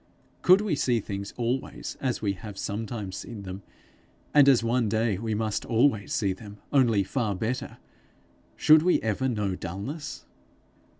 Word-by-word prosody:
Could 185 +2 +6
we 210 -5 -1
see 125 -4 +1
things 100 -1 -5
always 125 +2 -3
as 130 -4 -1
we 100 -2 +1
have 100 +1 -9
sometimes 105 -2 -4
seen 110 -4 -7
them 95 +1 -7 0.7
and 145 -2 +7
as 125 -4 +5
one 115 -1 +1
day 110 -2 +1
we 110 -1 -2
must 110 -1 -1
always 115 -3 +2
see 100 -4 +1
them, 105 +1 -11 0.2
only 120 -7 +4
far 110 -1 -1
better 115 +6 -3 0.8
should 155 0 +6
we 180 +2 +3
ever 115 +4 0
know 105 -5 -1
dullness? 105 - -6
110 Hz, 155 wpm, -27 LUFS, 100-130 Hz, 0.8 s, and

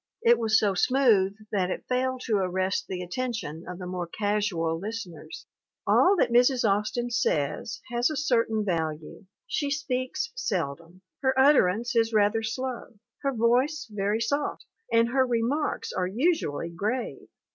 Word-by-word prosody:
It 235 0 +5
was 220 -2 +3
so 205 -3 +2
smooth 205 -3 +3 0.2
that 185 -3 0
it - - -4
failed 255 0 -1
to 215 -3 +1
arrest 185 0 -1
the 180 -1 -4
attention 180 - -4
of 180 - -6
the 180 - -7
more 180 -1 -4
casual 200 -5 -1
listeners.... 190 -6 -7 0.4
"All 385 +2 +5
that 235 - +2
Mrs. 245 0 +4
Austin 210 +4 0
says 155 - -1
has 240 +3 +2
a 310 - -3
certain 230 -6 +1
value. 160 0 -3 0.2
She 290 -12 -2
speaks 255 -3 -2
seldom. 175 - -4 0.2
Her 265 -1 +1
utterance 240 -5 +4
is 225 0 +2
rather 210 +1 +3
slow, 245 +1 -4 0.3
her 275 - 0
voice 250 +6 +1
very 205 +2 -1
soft, 285 +5 -2 0.3
and 230 0 +4
her 260 +1 +3
remarks 245 +4 -1
are 180 -1 -1
usually 215 - 0
grave. 215 +9 -3
225 Hz, 145 wpm, -27 LUFS, 185-255 Hz, 0.4 s, It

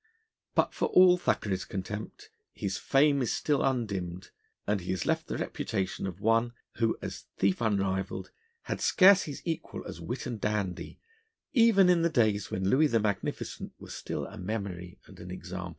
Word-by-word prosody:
But - - +2
for - - 0
all 180 -1 +7
Thackeray's 95 - 0
contempt 105 +3 -6 0.2
his 95 -1 -3
fame 140 0 +3
is 120 - 0
still 145 -2 +1
undimmed, 95 -8 -2 0.3
and 105 -2 0
he 90 - -8
has 95 -3 -1
left - - 0
the - - -3
reputation 95 +1 -3
of 90 0 -7
one 115 +3 +2 0.2
who, 115 -1 +1
as - - -6
thief 95 +3 +1
unrivalled, 100 -3 -1 0.3
had - - -4
scarce 190 0 +6
his 145 -3 -7
equal 165 -2 -4
as 85 - -8
wit 120 +10 -4
and 120 -4 -5
dandy 100 -4 -2 0.5
even 225 -6 +6
in 175 -2 +4
the 170 - +3
days 110 - +1
when 95 0 -2
Louis 140 +9 +4
the 115 -5 +2
Magnificent 105 -2 -3
was - - -10
still - - -4
a 105 - -10
memory 90 -3 -5
and - - -15
an 90 - -9
example. 90 0 -6
105 Hz, 170 wpm, -29 LUFS, 95-135 Hz, 0.5 s, all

